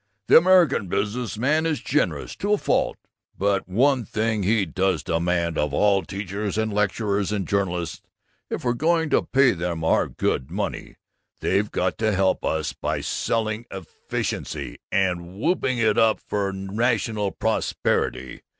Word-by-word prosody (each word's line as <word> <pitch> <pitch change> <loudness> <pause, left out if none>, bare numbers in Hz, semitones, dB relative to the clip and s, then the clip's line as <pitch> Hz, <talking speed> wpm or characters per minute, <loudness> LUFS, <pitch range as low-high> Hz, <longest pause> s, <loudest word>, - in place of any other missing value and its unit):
The - - +9
American 170 - +4
business 105 +5 -2
man 155 +7 +2
is 155 -3 -1
generous 150 +3 -1
to 205 +1 0
a - - +4
fault, - - 0 0.4
but 100 -1 0
one 130 +6 +3
thing 110 +1 -1
he 105 +1 +2
does 95 0 0
demand 85 0 0
of 75 -1 0
all 100 -2 +3
teachers 100 +2 -4
and 110 -1 0
lecturers 105 -1 0
and 100 -3 -2
journalists: 90 -4 -1 0.5
if - - -4
we're 120 -1 +1
going 160 +4 +1
to - - +4
pay 135 -1 +3
them 85 -2 -3
our 80 - +2
good 65 - -2
money, - - -4 0.4
they've 100 +2 +1
got - - -1
to 110 -1 +1
help 95 0 +1
us - - -1
by - - -3
selling 110 +1 -2
efficiency 95 -4 -5
and 90 -1 -1
whooping 140 -3 +1
it 110 -2 +2
up 110 -1 +4
for 100 -1 -2
rational 105 +2 -1
prosperity! 110 - -1
105 Hz, 150 wpm, -24 LUFS, 95-120 Hz, 0.5 s, The